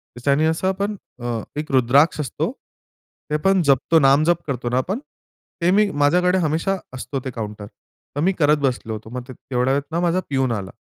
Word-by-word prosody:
त्याच्याने 140 +5 +2
असं 160 +4 0
आपण 200 +2 -1 0.3
अ, 120 -2 -2 0.2
एक 155 -2 -5
रुद्राक्ष 135 +6 +4
असतो, 135 - -2 0.8
ते 150 - +2
पण 195 -1 +4
जपतो, 140 +4 +4
नामजप 155 +5 +4
करतो 125 -3 -2
ना 125 - 0
आपण. 190 - -1 0.6
ते 175 +2 +3
मी 205 +1 +4
माझ्याकडे 180 +6 +3
हमेशा 165 +4 0 0.2
असतो 135 +2 -4
ते 130 - -3
काउंटर. 105 -2 -6 0.5
तर - - -2
मी 190 +3 +3
करत 150 0 +4
बसलो 125 -5 -1
होतो. 110 +1 -8
मग 125 0 -5
ते 130 - -8
तेवढ्या 125 +2 -1
वेळेत 140 +2 -2
ना 170 - 0
माझा 175 +1 +2
प्यून 135 -2 +1
आला 100 -4 -4
145 Hz, 190 wpm, -21 LUFS, 125-170 Hz, 0.8 s, रुद्राक्ष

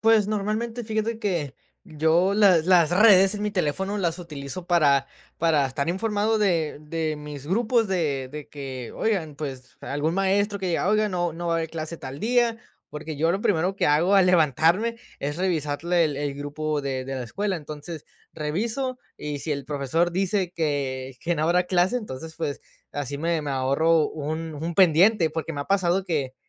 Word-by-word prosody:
Pues 220 -2 +4
normalmente, 215 +3 -2
fíjate 220 +1 -2
que 170 - -2 0.3
yo 160 +5 +2
las 185 -6 +5
las 175 -4 +5
redes 195 0 +6
en 205 - -4
mi 210 - 0
teléfono 190 +2 -1
las 170 -2 -1
utilizo 155 0 -7
para 145 -6 +3 0.3
para 155 -4 +3
estar 140 +4 -3
informado 210 +3 0
de 170 -8 +1
de 155 0 -2
mis 150 -1 -8
grupos 225 +3 +1
de 145 -8 -1
de 150 -1 -8
que, 130 -4 -7
oigan, 175 -9 -1
pues 135 -3 -7
algún 150 +4 -2
maestro 200 +2 +1
que 190 - -3
diga: 175 +3 0
"Oigan, 215 0 +2
no 175 -2 -1
no 170 +1 -5
va 165 - +1
a - - +2
haber 160 -1 -3
clase 165 0 -5
tal 135 +1 -8
día". 235 0 +2 0.3
Porque 150 0 -6
yo 165 +3 +2
lo 195 - -1
primero 185 0 +1
que - - 0
hago 165 +7 +3
al 190 -2 +6
levantarme 175 - +3 0.2
es 145 +2 -3
revisarle 170 -1 0
el 145 -3 -2
el 145 -1 -2
grupo 145 +1 -3
de 135 -2 -3
de 135 - -5
la 130 - -3
escuela. 195 - -2
Entonces, 155 +1 -8 0.3
reviso, 230 - -2 0.2
y 150 -1 -4
si 155 - -2
el 140 -1 -4
profesor 150 +5 0
dice 190 -1 0
que 135 -5 -2
que 170 0 0
no 150 - -1
habrá 180 +2 +3
clase, 180 +5 +2
entonces, 160 - -6
pues, 145 -4 -3 0.3
así 145 0 -4
me 165 0 0
me 145 - -4
ahorro 145 +5 +2
un 155 +1 -4
un 165 +3 -4
pendiente. 180 +1 +5
Porque 160 +1 -4
me 145 - -4
ha - - -14
pasado 190 0 +1
que 140 -7 -2
165 Hz, 185 wpm, -25 LUFS, 145-195 Hz, 0.3 s, redes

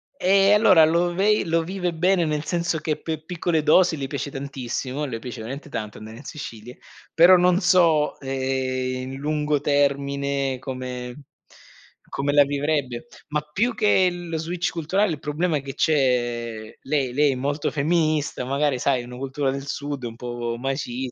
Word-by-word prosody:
Eh, 195 -2 +4
allora, 200 -6 +6
lo 170 +2 +1
vei 210 +4 +2
lo 165 -1 +1
vive 180 0 -3
bene, 175 +2 +2
nel 150 -1 -1
senso 170 -1 -1
che, 155 -1 -2
per 160 -1 -4
piccole 170 -1 -1
dosi 160 +2 +4
le 135 -1 -3
piace 140 +1 -4
tantissimo, 135 +1 -4
le 115 -5 -5
piace 125 +1 -7
veramente 135 +7 -7
tanto 110 -5 -5
andare 110 +1 -10
in 135 - -12
Sicilia, 120 -6 -9 0.3
però 175 +3 +7
non 180 0 +3
so, 170 -5 +3
ehm, 130 -1 -2
i - - -4
in 130 +1 -6
lungo 150 +1 0
termine, 140 -1 0
come 125 0 -6 0.9
come 140 +1 -1
la 145 0 +7
vivrebbe, 140 -2 -2 0.2
ma 150 0 -1
più 230 +8 0
che 205 -4 +4
lo 175 -2 -5
switch 170 +2 -2
culturale 185 +5 0
il 155 - -4
problema 150 +2 -1
che 135 0 -7
c'è 120 -6 0
lei 135 -3 -1
lei 145 0 +3
è - - -2
molto 145 +4 -1
femminista, 155 -3 0
magari, 140 -1 0
sai, 130 -2 +1
una 125 +1 -9
cultura 135 +1 -2
del 135 +1 -6
Sud, 140 -1 -4
un 115 -1 -6
po' 120 -1 -4
macis 130 -1 -3
145 Hz, 170 wpm, -23 LUFS, 130-165 Hz, 0.9 s, però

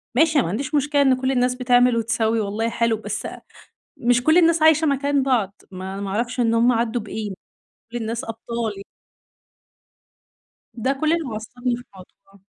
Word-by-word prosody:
ماشي 315 +3 +3
أنا - - +2
ما - - -3
عنديش 265 - -3
مشكلة 290 0 +2
إن 265 -2 +4
كلّ 260 0 +1
الناس 250 -1 +1
بتعمل 245 -1 +3
وتسوّي 225 0 0
والله 215 +2 -1
حلو 230 -1 0
بس 220 - -5 0.7
مش 245 +1 +2
كل 315 +4 +4
الناس 330 -1 +4
عايشة 315 0 +5
مكان 280 0 +1
بعض 220 -7 0
ما 190 +1 -6
ما 195 - -4
أعرفش 235 +5 -2
إن 230 -1 +2
هُم 235 +2 +4
عدوا 235 0 0
بإيه، 215 0 -5
مش - - -7 0.6
كل 240 - -3
الناس 230 +2 -3
أبطال 225 -2 -4
ي - - -8 1.9
ده 260 +3 0
كل 310 +1 +3
اللي 310 -10 -2
عصبني 245 +3 -3
في 245 - -10
الموضوع. 195 +1 -18
240 Hz, 175 wpm, -22 LUFS, 220-270 Hz, 1.9 s, عايشة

